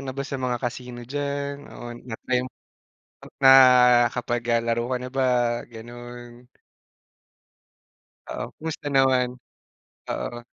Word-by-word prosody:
na 130 0 -6
ba 140 - -3
sa 140 -1 -5
mga 125 -1 -1
casino 120 0 -5
diyan? 140 +2 -3 0.2
Oo, - - -9 0.2
na-try, 125 +2 -1
eh, - - -5 1.0
nakapag 125 -2 +6
ah, 115 - +3
laro 115 0 0
ka 125 - +1
na 125 - -6
ba, 135 +1 -1 0.5
ganon? 120 +1 -11 1.9
Oo, - - -5
kumusta 160 -1 -6
naman? 130 -2 +2 0.7
Oo. 120 - -4
125 Hz, 115 wpm, -24 LUFS, 120-135 Hz, 1.9 s, nakapag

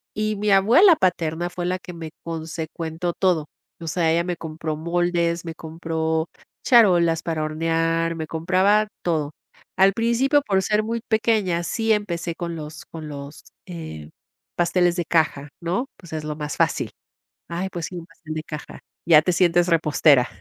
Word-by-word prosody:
y 215 0 -1
mi 210 +1 -1
abuela 240 - +6
paterna 175 - 0
fue 175 -1 -4
la 185 +1 0
que 180 0 -10
me 165 -2 -7
consecuentó 165 +1 -4
todo. 170 -6 +1 0.3
O 165 - -6
sea, 165 -1 +1
ella 170 +1 +2
me 180 -1 -2
compró 155 -1 -4
moldes, 170 +1 0
me 165 - -5
compró 160 0 -2 0.4
charolas 175 - +5
para 160 -2 -2
hornear, 165 +1 0
me 160 -1 -5
compraba 190 +6 +2 0.2
todo. 155 -4 0 0.5
Al 195 +1 +5
principio, 235 +6 +2
por 190 -1 +2
ser 210 +2 +1
muy 230 +1 -3
pequeña, 215 -6 +1
sí 225 +5 -1
empecé 170 -5 -2
con 170 -2 -4
los 155 0 -8
con 160 -2 -9
los, 140 +1 -9 0.2
eh, 160 - -8 0.5
pasteles 175 0 +2
de 175 - -1
caja, 150 -3 +1
¿no? 180 +10 -1
Pues 175 -3 -13
es 155 -1 -3
lo 150 0 -3
más 150 -1 -5
fácil. - - +1 0.6
Ay, 180 +3 -3
pues 170 -2 -4
sí, 180 - -9
un 165 - -7
pastel 165 -3 -10
de 155 - -4
caja. 150 -1 -8 0.3
Ya 160 -3 +7
te 180 - +1
sientes 175 0 +3
repostera. 150 -5 +4
170 Hz, 170 wpm, -23 LUFS, 160-185 Hz, 0.6 s, Ya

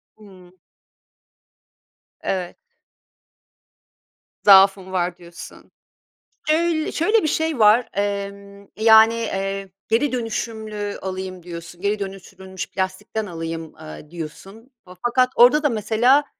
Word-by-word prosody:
Hıı. 185 -4 -17 1.7
Evet. 180 -2 -3 1.9
Zaafım 195 -1 +6
var 180 -1 -1
diyorsun. 170 -1 -13 0.8
Öy 320 -1 0
şöyle 420 +7 +2
bir 310 - 0
şey 320 -1 -1
var, 220 +3 +5
emm, 200 0 -4
yani, 220 +1 +6
eee, 195 -3 -3 0.2
geri 250 +6 +1
dönüşümlü 220 -3 -4
alayım 185 -1 -5
diyorsun, 170 0 -9
geri 205 +2 0
dönüştürülmüş 190 -1 -8
plastikten 195 +3 -3
alayım, 165 -2 -6
eee, 75 - -11
diyorsun 195 - -9 0.3
fakat 255 +1 +3
orada 250 +6 +6
da 295 - +3
mesela, 235 +4 +2
200 Hz, 100 wpm, -21 LUFS, 185-230 Hz, 1.9 s, Zaafım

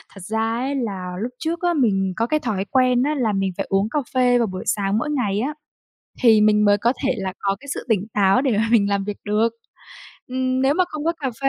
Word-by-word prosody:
thật 195 - -10
ra 220 +2 -1
ấy, 270 +3 -2
là 195 -8 -4
lúc 245 +2 -3
trước 330 +2 -3
á, 350 -1 +1
mình 195 - +1
có 230 +1 0
cái 305 +3 +1
thói 205 -8 -2
quen 255 -2 +3
á, 300 +2 0
là 225 -6 0
mình 195 -1 0
phải 195 - -2
uống 195 +3 +1
cà 300 - 0
phê 250 -1 +3
vào 230 -2 +1
buổi 185 -1 -6
sáng 200 0 0
mỗi 300 +6 -2
ngày 210 -8 0
á, 285 +6 -2 0.7
thì 220 -3 +6
mình 210 0 +4
mới 205 0 +4
có 235 +5 +1
thể 260 - +2
là 190 -1 -3
có 195 0 0
cái 280 - -14
sự - - -7
tỉnh 210 -1 +1
táo 200 +4 +3
để 250 -7 +1
mà 225 +1 +1
mình 205 -4 +4
làm 200 -1 0
việc 205 0 -5
được, 215 +2 +2 0.8
ừm, 255 0 -1
nếu 275 +2 +3
mà 365 +1 +3
không 305 0 -6
có 335 - +2
cà 265 -2 -1
phê 275 - +2
225 Hz, 255 wpm, -21 LUFS, 200-260 Hz, 0.8 s, thì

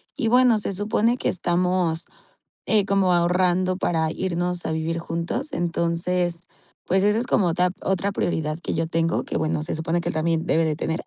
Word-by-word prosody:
Y, 255 -6 -1
bueno, 250 -2 +5
se 200 -1 -3
supone 215 +4 +1
que - - -1
estamos, 175 -1 0 0.6
eh, 210 -3 +3
como 195 -2 +2
ahorrando 180 +1 +2
para 160 -4 0
irnos 180 -1 -2
a - - -1
vivir 160 +1 -2
juntos, 170 - -3
entonces, 170 0 -1 0.4
pues, 190 +1 +2
eso 210 +2 +3
es 245 - -3
como 185 - +2
otra 180 +2 +2
otra 195 +1 0
prioridad 155 -5 -1
que - - -4
yo 165 0 -1
tengo, 165 +1 0
que, - - -3
bueno, 155 -1 -1
se 155 - -3
supone 165 +2 -1
que - - -2
también 165 +1 0
debe 165 0 +2
de 155 -1 0
tener. 160 +1 -3
175 Hz, 185 wpm, -23 LUFS, 165-190 Hz, 0.6 s, bueno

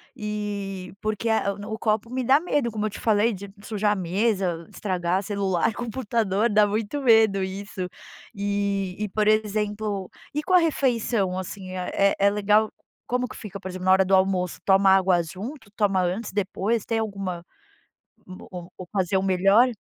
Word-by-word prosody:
E 200 -3 -4
porque 215 +1 -1
a 200 -3 +1
no 205 +1 -8
o 220 - -5
copo 215 +1 0
me 255 0 -2
dá 270 +4 +5
medo, 290 -8 0
como 215 0 -2
eu - - 0
te - - -9
falei, 220 +1 +2
de 200 +1 -8
sujar 210 -1 0
a - - -2
mesa, 185 -2 0
estragar 185 -1 -1
celular, 200 0 0
computador. 230 -3 0
Dá 210 0 +4
muito 220 +7 -2
medo 220 -5 +5
isso. 190 -1 -5 0.5
E 200 -2 -1
e 210 -1 -2
por 210 +2 0
exemplo, 210 -2 0 0.2
e 300 +1 -2
com 370 - -1
a - - +9
refeição 235 - +1
assim, 185 0 -7
é 185 +2 +1
é 200 +1 +5
legal 210 +1 +3 0.4
como 250 0 0
que - - -11
fica, 200 -2 -8
por 190 - -7
exemplo, 185 0 -6
na 185 - +5
hora 190 0 +5
do 190 +1 +4
almoço, 185 -1 +1
toma 195 0 +5
água 185 -2 +4
junto, 200 - -8
toma 195 -3 +2
antes, 185 +5 -2
depois? 205 +3 -1
Tem 225 -1 0
alguma 195 -5 -4 0.8
uma 185 - -10
o 180 0 -8
ocasião 190 0 -1
melhor? 195 +6 +4
200 Hz, 170 wpm, -25 LUFS, 190-220 Hz, 0.8 s, a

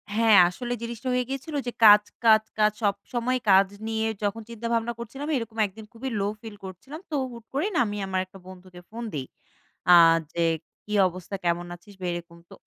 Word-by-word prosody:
হ্যাঁ, 225 -3 +5
আসলে 245 +6 -5
জিনিসটা 235 +2 -6
হয়ে 250 0 +1
গিয়েছিল 275 +3 -5
যে, - - -1
কাজ, 210 0 +9 0.2
কাজ, 220 -1 +6 0.2
কাজ! 210 0 +5
সবসময় 235 +5 -1
কাজ 190 +1 +6 0.2
নিয়ে 220 0 -1 0.2
যখন 205 +2 -1
চিন্তা 230 0 -5
ভাবনা 230 +1 0
করছিলাম 270 +5 -6
এরকম 225 -1 -6
১ 195 - -7
দিন 220 - -9
খুবই 250 +3 -5
লো 200 - 0
ফিল 220 -2 -9
করছিলাম। 265 - -9
তো 305 - -3 0.2
হুট 235 -1 -11
করেই 365 +10 0
না - - +3
আমি 205 0 -4
আমার 190 -1 -1
একটা 190 +1 -15
বন্ধুকে 185 -1 -12
ফোন 235 +2 -7
দেই। 135 -3 -3 0.7
আ - - +10 0.4
যে 170 -1 +1 0.4
কি 210 - -6 0.2
অবস্থা? 185 +2 -7
কেমন 170 +1 0
আছিস? 175 +4 -17
বা - - -4
এরকম। 170 0 -8
তো - - -13
220 Hz, 200 wpm, -26 LUFS, 190-235 Hz, 0.7 s, আ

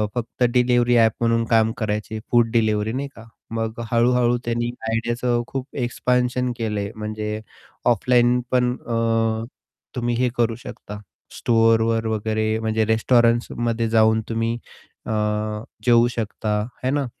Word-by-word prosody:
फक्त 120 +1 -2
अ, - - +7
delivery 120 0 +3
app 115 -1 +5
म्हणून 115 0 +2
काम 110 -1 +3
करायचे. 110 0 -3
Food 120 -2 +4
delivery. 110 -2 +1
नाही 140 +2 -3
का? 115 - -12 0.3
मग 115 0 -3
हळू-हळू 120 0 +3
त्यांनी 120 0 -1 0.2
आयडियाचं 120 +1 0
खूप 135 0 -5
एक्सपान्शन 125 0 0
केलंय 105 -3 -2
म्हणजे 105 0 -4 0.5
ऑफलाईन 120 +2 +3
पण 125 -1 +2
अ, 115 -1 0 0.5
तुम्ही 120 -1 -1
हे 125 +1 +1
करू 115 -1 +1
शकता, 105 -4 -9 0.4
स्टोअरवर 115 0 +3
वगैरे 110 0 -1
म्हणजे 110 0 0
रेस्टॉरंटसमध्ये 115 0 +2
जाऊन 110 0 +4
तुम्ही 115 +1 -1 0.5
अ, - - -2 0.7
जेवू 120 -1 +5
शकता. 115 -2 -4 0.3
आहे 130 - +1
ना? 145 -1 0
115 Hz, 130 wpm, -22 LUFS, 110-120 Hz, 0.7 s, अ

